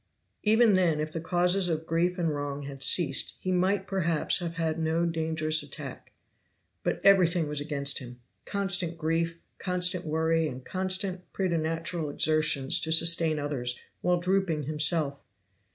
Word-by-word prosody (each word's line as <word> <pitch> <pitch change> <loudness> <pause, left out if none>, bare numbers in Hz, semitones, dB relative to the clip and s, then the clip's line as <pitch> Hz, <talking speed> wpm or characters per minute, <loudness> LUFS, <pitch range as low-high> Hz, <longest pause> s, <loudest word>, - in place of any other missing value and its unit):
Even 220 +1 +4
then 175 -5 +2
if 155 0 -3
the 165 - -5
causes 180 +2 +1
of 160 -1 -2
grief 170 +3 0
and 165 -3 0
wrong 145 0 -4
had 140 -1 -9
ceased 145 -3 +2
he 185 - -3
might 190 +2 +1
perhaps 170 -5 0
have 170 -2 -5
had 165 -1 -2
no 160 +1 0
dangerous 160 -1 +1
attack. - - -9 0.7
But - - -2
everything 180 -4 +4
was 150 -1 -3
against 140 -1 -2
him; 125 -1 -11 0.2
constant 190 -4 -1
grief, 165 +1 -1 0.2
constant 180 -1 -1
worry 160 0 0
and 130 -3 -8
constant 185 0 -3
preternatural 165 -2 -2
exertions 150 -2 +2
to 160 - -3
sustain 165 -1 +4
others 135 -4 -2 0.2
while 180 0 +1
drooping 180 -4 0
himself. 150 -1 +1
165 Hz, 145 wpm, -28 LUFS, 155-180 Hz, 0.7 s, Even